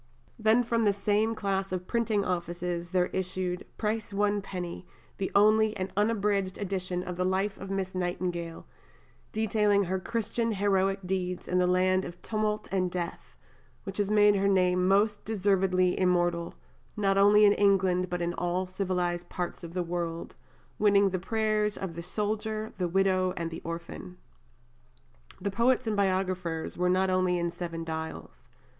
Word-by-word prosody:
Then 220 +3 +4
from 230 -1 0
the 205 -2 +3
same 210 +3 +1
class 195 -2 -1
of 180 -1 -3
printing 220 -2 0
offices 175 -1 -3
there 180 -1 +2
issued 185 -1 -2
"Price 215 0 -2
One 205 0 +1
Penny, 180 -2 -6 0.3
The 190 - -1
Only 215 +1 +4
and 185 0 -3
Unabridged 205 -2 +1
Edition 185 -2 -3
of 180 -1 -6
the 180 - 0
Life 190 +2 0
of 195 - -7
Miss 195 -1 -2
Nightingale, 175 -2 -3 0.7
Detailing 210 -2 +2
her 190 +1 -1
Christian 230 +2 -1
Heroic 195 -1 +1
Deeds 180 -1 -2
in 180 - +1
the 180 - +3
Land 185 +1 +3
of 175 -1 -8
Tumult 215 -1 -1
and 185 -2 +1
Death, 175 -1 -5 0.5
which 195 +1 -6
has 205 -1 +1
made 210 -1 +5
her 195 0 +2
name 180 -2 +3
most 205 +2 +2
deservedly 190 -3 +1
Immortal, 175 -2 +1 0.4
not 195 -1 +2
only 205 +1 +6
in 205 - +6
England, 190 -3 +2
but 175 -1 -2
in 170 0 -1
all 175 +2 -1
Civilized 180 -2 -2
Parts 180 0 -4
of 170 +1 -8
the 180 - 0
World, 170 -1 -4 0.5
winning 200 -2 +4
the 185 - -1
Prayers 215 +1 0
of 190 -3 -5
the 170 - -6
Soldier, 215 +3 -2
the 180 - +1
Widow, 185 0 +2
and 165 -1 -3
the 165 - -7
Orphan." 170 +2 -7 1.2
The 200 +2 -2
poets 240 +4 +2
and 220 -1 0
biographers 185 -4 -1
were 180 +1 +1
not 185 +1 +2
only 185 -1 +2
in 170 0 -1
Seven 170 -1 -5
Dials. 160 0 -7
190 Hz, 160 wpm, -28 LUFS, 180-205 Hz, 1.2 s, only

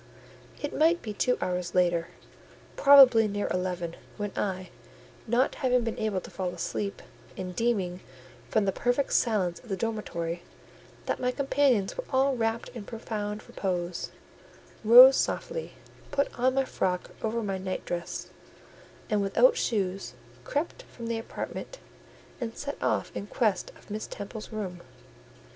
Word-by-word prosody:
It 290 - -3
might 330 +3 +3
be 215 - -4
two 250 +4 +1
hours 180 -1 -2
later, 175 -2 +3 0.7
probably 265 -6 +8
near 205 0 -2
eleven, 180 -2 -2 0.2
when 205 -1 -3
I—not 210 +5 -3
having 250 -2 +3
been 230 -1 -3
able 215 -3 0
to - - -11
fall 185 -2 -2
asleep, 200 +3 -3 0.3
and 185 -1 -5
deeming, 195 -7 0 0.5
from 215 -2 +2
the 195 - +2
perfect 245 +7 0
silence 195 -7 +2
of 240 - -17
the 195 - -1
dormitory, 175 -7 -3 0.6
that - - -1
my 250 - +1
companions 265 -6 +2
were - - -4
all 270 0 +3
wrapt 225 -1 -1
in 235 -4 -8
profound 210 -2 -5
repose—rose 205 +7 +3
softly, 485 0 -2 0.4
put 280 - 0
on 255 +2 +2
my 270 0 +2
frock 180 -7 -1
over 225 +1 -1
my 195 -2 -2
night 185 0 -4
dress, 175 -1 -4 0.8
and, 210 -2 +1
without 460 - +4
shoes, 195 - -1 0.3
crept 320 +11 -2
from 235 - -8
the 230 0 -1
apartment, - - -6 0.6
and 230 -3 -4
set 285 0 -5
off - - 0
in 200 - -4
quest 210 -5 0
of - - -16
Miss 215 +1 -4
Temple's 210 +2 -7
room. 190 -5 -5
215 Hz, 140 wpm, -28 LUFS, 185-250 Hz, 0.8 s, probably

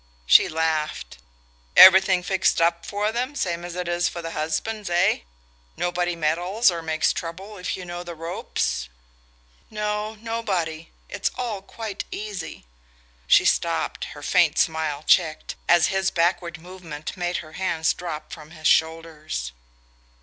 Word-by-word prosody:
She - - +6
laughed. 155 - -2 0.6
"Everything 190 -1 +8
fixed 190 0 +1
up 170 0 +1
for 210 +1 -1
them, 250 +5 -3
same 175 -8 -2
as 175 0 -7
it 180 -1 -3
is 175 0 +1
for 170 - -7
the 165 - -5
husbands, 175 +7 -3
eh? 175 +2 +2 0.6
Nobody 175 0 -1
meddles 175 +7 +2
or 170 -1 -4
makes 160 0 +1
trouble 190 +5 -7
if 180 - -3
you 185 - -8
know 175 0 -6
the 175 -1 -8
ropes?" 165 - -3 0.8
"No, 210 0 -3
nobody... 195 -8 -3 0.2
it's 200 - -2
all 230 -6 -3
quite 215 +1 -6
easy...." 205 - -6 0.6
She - - +6
stopped, - - 0
her - - -10
faint - - +3
smile 155 -2 0
checked, 155 -3 +2 0.2
as 175 -1 +5
his 190 0 +1
backward 170 -1 0
movement 170 -3 -8
made 175 -1 -2
her 155 - -14
hands 170 -3 0
drop 165 -4 -7
from 155 -1 -10
his 155 -1 -13
shoulders. 160 - 0
175 Hz, 140 wpm, -24 LUFS, 160-190 Hz, 0.8 s, Everything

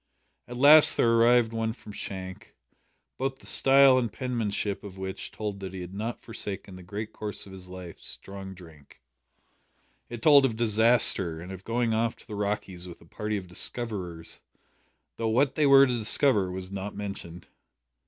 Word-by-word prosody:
At 125 - -8
last 150 +4 +7
there 115 - +3
arrived 115 0 +4
one 115 0 -2
from 110 - -13
Shank, 95 -2 -8 0.6
both 135 0 -2
the - - -20
style 135 -1 +6
and 120 -4 -2
penmanship 110 -5 -3
of 100 -2 -10
which 95 0 -6
told 105 -2 -5
that 95 -1 -7
he 95 - -6
had 90 +1 -8
not 110 +4 -4
forsaken 100 -4 -5
the 90 - -11
great 100 +4 -7
curse 105 -1 -6
of 100 - -13
his 95 -1 -11
life 90 -2 -10
strong 95 -1 -9
drink. 80 -5 -16 1.1
It 120 -1 -8
told 145 -2 +7
of 125 -4 +1
disaster, 110 -6 +2
and 90 +3 -9
of 95 0 -9
going 115 +1 -1
off 115 +1 0
to - - -17
the 110 - -9
"Rockies" 100 -3 -4
with 85 - -11
a - - -19
party 105 +5 -4
of 95 -2 -7
"discoverers," 90 -4 -3 0.8
though 115 -1 -1
what 130 +4 +2
they 150 0 +2
were 140 0 +8
to 125 -3 -1
discover 110 -3 +3
was 95 0 -6
not 100 +1 -6
mentioned. 100 -4 -7
105 Hz, 175 wpm, -27 LUFS, 95-120 Hz, 1.1 s, were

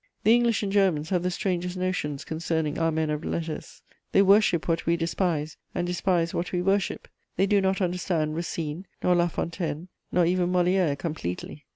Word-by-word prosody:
The 220 - +6
English 235 -3 +3
and 200 - -1
Germans 185 -6 +2
have 180 -2 +2
the 180 - 0
strangest 180 -2 -2
notions 180 -6 -2
concerning 160 -1 -2
our 165 0 +2
men 155 -1 0
of 150 +1 -3
letters: 160 -2 -5 0.3
they 195 - +6
worship 195 -4 +4
what 165 -1 0
we 170 0 +3
despise, 165 -2 -1 0.2
and 175 - 0
despise 175 -1 0
what 175 - -2
we 180 - 0
worship; 195 +2 0 0.3
they 190 - +3
do 200 0 +3
not 190 +1 +1
understand 175 -4 0
Racine 165 +1 -4 0.2
nor 180 - +4
La 175 0 +3
Fontaine, 170 0 -4 0.2
nor 180 -1 +3
even 180 +1 +1
Molière 180 -4 +2
completely. 150 - -5
175 Hz, 180 wpm, -26 LUFS, 160-185 Hz, 0.3 s, The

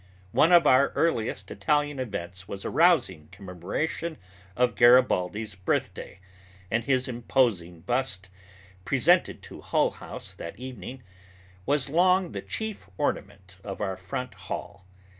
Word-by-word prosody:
One 160 - +4
of 175 -1 +7
our 130 +2 +5
earliest 110 - 0
Italian 145 +6 0
events 95 -6 -5
was 100 0 -7
a - - -2
rousing 155 - +3
commemoration 100 - -4 0.4
of 125 -1 +2
Garibaldi's 110 -3 +4
birthday, 95 +1 -3 0.5
and 115 +1 +1
his 130 0 +1
imposing 115 -9 0
bust, 105 -2 -1 0.6
presented - - +2
to - - -11
Hull - - +1
House - - -9
that 85 - -8
evening, 125 0 -8 0.6
was 140 -2 +2
long 180 +4 +3
the - - -5
chief 220 - -5
ornament 90 -1 -3
of 95 - -6
our 95 -2 -2
front 100 +6 -5
hall. 95 +1 -7
115 Hz, 125 wpm, -27 LUFS, 95-135 Hz, 0.6 s, of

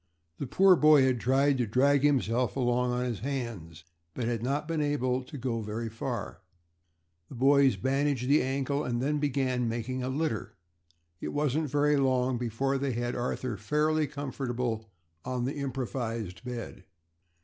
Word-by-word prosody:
The 140 - -3
poor 190 +7 +6
boy 150 -3 +6
had 130 -2 +2
tried 135 +3 +2
to 120 - +1
drag 135 +5 +3
himself 125 -5 +1
along 125 -1 +1
on 125 0 -1
his 120 -4 -3
hands 115 - -5 0.3
but 125 - -2
had 115 -1 -1
not 140 +5 -1
been 165 -2 -1
able 130 -3 0
to 145 - -9
get 120 -2 -2
very 110 +2 -4
far. 110 - -5 0.9
The - - -9
boys 135 +1 +4
bandaged 135 -1 0
the 145 +3 +5
ankle 140 +2 -1
and 120 -3 -1
then 145 +4 0
began 130 -4 0
making 120 +3 -3
a 125 - -2
litter. 135 -5 -2 0.6
It - - -5
wasn't 150 +1 0
very 145 +1 +2
long 130 -2 +1
before 130 +4 -1
they 135 -1 -1
had 120 +1 -2
Arthur 120 -2 -2
fairly 150 +7 +1
comfortable 125 -5 -3 0.3
on 125 -1 -2
the 135 - -2
improvised 120 -8 -4
bed. 120 -6 -6
130 Hz, 160 wpm, -29 LUFS, 120-140 Hz, 0.9 s, poor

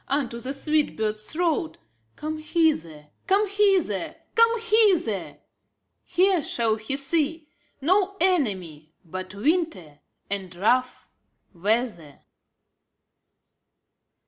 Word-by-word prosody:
^^ - - -36
Unto 270 -4 -1
the 255 +3 -3
sweet 300 +2 0
bird's 215 -1 -2
throat, 325 -1 -1
" 115 0 -44
""" 110 - -43
Come 310 +1 -4
hither, 295 - 0 0.2
come 400 +2 +3
hither, 390 - +1 0.2
come 460 0 +4
hither! 415 - +2 0.7
Here 365 -1 +2
shall 230 -5 0
he 220 +5 -3
see 305 +2 -1 0.3
No 385 +6 +2
enemy 190 - 0
But 185 +3 -7
winter 230 - -1 0.3
and 190 -3 -4
rough 250 +7 +1 0.5
weather. 200 - -1
275 Hz, 105 wpm, -25 LUFS, -, 0.7 s, come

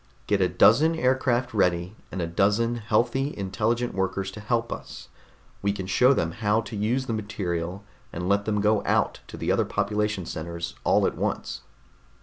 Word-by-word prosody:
Get 100 -2 +1
a 90 - +3
dozen 120 - +5
aircraft 130 -4 +1
ready, 90 -1 +1 0.2
and 90 -2 -3
a - - 0
dozen 105 +8 +1
healthy, 120 +6 0
intelligent 110 +5 -1
workers 95 0 -2
to 110 - -9
help 115 +2 -1
us. - - -10 0.5
We 100 - +1
can 95 -2 -5
show 125 +8 +4
them 85 -11 +1
how 105 +3 +1
to 110 0 -8
use 115 +6 0
the 115 - -2
material, 100 -4 -3 0.3
and 90 +1 -4
let 100 +1 +2
them 105 -2 0
go 105 0 +2
out - - +1
to - - -9
the - - -1
other - - +3
population 105 -1 -1
centers 85 +1 -5
all - - +3
at - - 0
once." - - -3
105 Hz, 175 wpm, -26 LUFS, 95-115 Hz, 0.5 s, dozen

